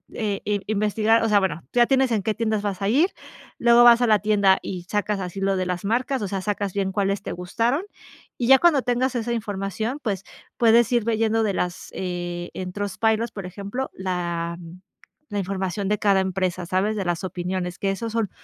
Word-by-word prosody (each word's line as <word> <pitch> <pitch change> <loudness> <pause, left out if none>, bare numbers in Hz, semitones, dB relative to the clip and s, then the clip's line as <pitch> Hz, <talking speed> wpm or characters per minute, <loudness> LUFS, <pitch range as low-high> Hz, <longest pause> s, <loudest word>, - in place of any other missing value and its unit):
eh, 205 -3 -2
eh, 205 -1 0
investigar. 215 +2 +2
O 225 - +1
sea, 210 -1 +5
bueno, 170 -5 -2
tú - - -6
ya 240 - +6
tienes 265 -2 +2
en 210 -4 0
qué 220 - 0
tiendas 220 -2 0
vas 200 -1 -3
a 195 - 0
ir, 305 - +4 0.5
luego 235 0 +6
vas 240 0 +7
a 245 - +3
la 215 -2 +4
tienda, 200 -2 +3
y 180 -2 -5
sacas 205 -1 -1
así 180 +2 -5
lo 195 0 +1
de 185 - -1
las 180 +1 -3
marcas, 250 +3 0
o 205 - -2
sea, 195 - -2
sacas 200 -1 -2
bien 195 -1 -1
cuáles 200 0 0
te - - -5
gustaron, 230 - -1 0.5
y 240 - -1
ya 270 0 +8
cuando 310 -7 +4
tengas 250 +1 0
esa 235 0 -1
información, 215 - -3
pues 195 -4 -2 0.3
puedes 235 0 +5
ir 235 - +3
viendo 225 0 +1
de 205 - 0
las, 180 -1 -3
eh, 175 -1 -4
en 185 -1 -5
Trustpilot, 220 +3 0
por 195 -3 -6
ejemplo, 200 +8 -5
la 170 -2 -3 0.7
la 205 -1 -2
información 195 0 -2
de 210 - +2
cada 200 -2 +3
empresa, 185 -1 -2
sabes 195 +4 0
de 195 - -2
las 175 +1 -1
opiniones, 180 0 -4
que 195 - 0
esos 225 +3 -4
son 225 -3 0
205 Hz, 210 wpm, -23 LUFS, 190-230 Hz, 0.7 s, ya